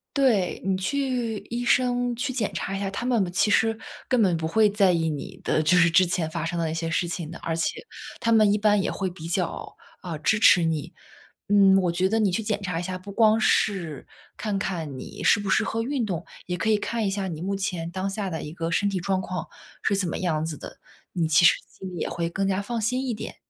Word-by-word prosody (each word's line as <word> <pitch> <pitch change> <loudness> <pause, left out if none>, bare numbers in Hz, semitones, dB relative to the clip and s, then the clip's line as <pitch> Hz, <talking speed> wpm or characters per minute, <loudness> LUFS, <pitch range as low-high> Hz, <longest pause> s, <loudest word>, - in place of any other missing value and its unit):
对， 240 -10 +2
你 190 0 0
去 245 +1 -1
医 240 +1 -3
生 245 0 +2
去 260 +3 -2
检 235 -5 -1
查 195 - -3
一 195 - -2
下， 195 - -2
他 200 +5 -4
们 225 -8 +1
其 205 +3 +3
实 225 +1 +3 0.3
根 250 -3 +2
本 180 -5 +3
不 160 - -2
会 215 +5 +4
在 200 -3 +3
意 165 -1 +1
你 145 -3 -5
的， 155 - +1
就 160 +4 +3
是 170 -1 +5
之 185 +2 +5
前 170 -2 -1
发 165 -1 -3
生 170 +1 -3
的 165 -2 -1
一 - - -3
些 165 0 -2
事 165 +2 0
情 170 -2 -4
的。 170 - -8
而 165 - -3
且 165 - -2 0.4
他 230 - +1
们 215 -2 +5
一 - - +2
般 210 -1 +3
也 - - -1
会 190 -2 -2
比 165 -2 -9
较， 175 0 -2 0.2
啊， 170 -4 -6
支 215 +8 +1
持 180 -5 +6
你。 160 -3 -2 0.6
嗯， 195 -2 +6
我 175 -2 +1
觉 180 +2 +1
得 220 +3 0
你 205 -4 +2
去 225 - 0
检 210 -1 -2
查 180 -3 -2
一 - - -3
下， 185 +1 -4
不 200 +2 -10
光 220 +1 +4
是 180 - 0 0.3
看 210 -3 -2
看 165 -8 -3
你 - - -9
适 - - +5
不 205 -1 -4
适 - - +3
合 225 0 -2
运 260 -2 -1
动， 175 -4 -3 0.2
也 180 - -3
可 220 +5 -1
以 215 - +4
看 225 +1 -2
一 - - +1
下 195 -1 -2
你 165 -3 -6
目 195 +2 -2
前 180 -4 -3
当 190 +1 -2
下 195 -1 -3
的 160 -2 -4
一 150 - -7
个 165 -1 -3
身 200 +4 +1
体 190 -2 -2
状 190 +1 0
况 180 -2 -4 0.4
是 200 - +1
怎 190 -2 +1
么 - - -3
样 160 -4 0
子 160 -2 -4
的。 - - -10 0.3
你 170 -3 0
其 160 +2 +4
实 - - +7
心 190 - -9
里 - - -6
也 - - -2
会 170 -1 -2
更 195 +3 -1
加 195 +1 0
放 230 +3 -3
心 250 +5 0
一 245 - -1
点。 215 - -7
190 Hz, 275 characters per minute, -25 LUFS, 170-215 Hz, 0.6 s, 实